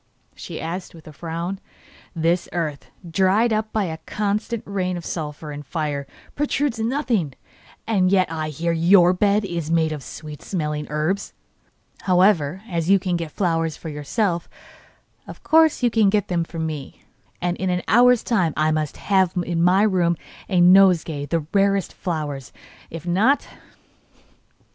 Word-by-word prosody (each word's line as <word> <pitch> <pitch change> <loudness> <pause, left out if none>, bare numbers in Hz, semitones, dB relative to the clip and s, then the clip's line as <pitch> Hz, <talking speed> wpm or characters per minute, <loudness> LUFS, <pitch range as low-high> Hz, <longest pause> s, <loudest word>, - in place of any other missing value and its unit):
she - - -8
asked, 175 +2 -5
with 160 - -15
a 155 - -10
frown. 170 +4 -4 0.6
'This 170 +2 0
earth, 155 -5 -3 0.2
dried 190 +7 +2
up 215 0 -1
by 215 - 0
a 160 -3 -4
constant 210 +2 -2
rain 185 -2 -2
of 170 - -8
sulphur 150 -1 -5
and 145 0 -7
fire, 145 -1 -3 0.3
produces 280 -5 -1
nothing, 230 - -1 0.5
yet 190 -3 +3
I 155 -1 -3
hear 165 +3 -2
that 165 - -2
YOUR 180 +1 +6
bed 200 +2 +2
is 170 -4 -4
made 165 -1 +2
of 150 -2 -5
sweet 150 +2 -9
smelling 150 -5 -3
herbs. 155 +6 -2 0.7
However, 185 -2 +2
as 170 -3 -2
you 195 - +7
can 180 -2 -2
get 170 -2 -3
flowers 165 -4 -1
for 165 - -7
yourself, 170 - -2 0.8
of - - -11
course 320 -4 +4
you 240 - +3
can 220 -3 +4
get 205 -1 0
them 170 -2 0
for 165 - -10
me, 155 -4 -5 0.4
and 175 0 -1
in 190 - -1
an 180 0 -1
hour's 245 +1 +5
time 180 -10 +1
I 155 0 +2
must 155 -2 -2
have 190 -3 +2
in 170 -1 -1
my 185 +3 +4
room 180 -5 +2 0.3
a 185 - +2
nosegay 175 -5 +5
of - - -16
the 165 -1 -1
rarest 195 -2 +2
flowers. 150 -6 -4 0.4
If 165 0 -8
not 210 +11 +2
175 Hz, 160 wpm, -22 LUFS, 160-200 Hz, 0.8 s, you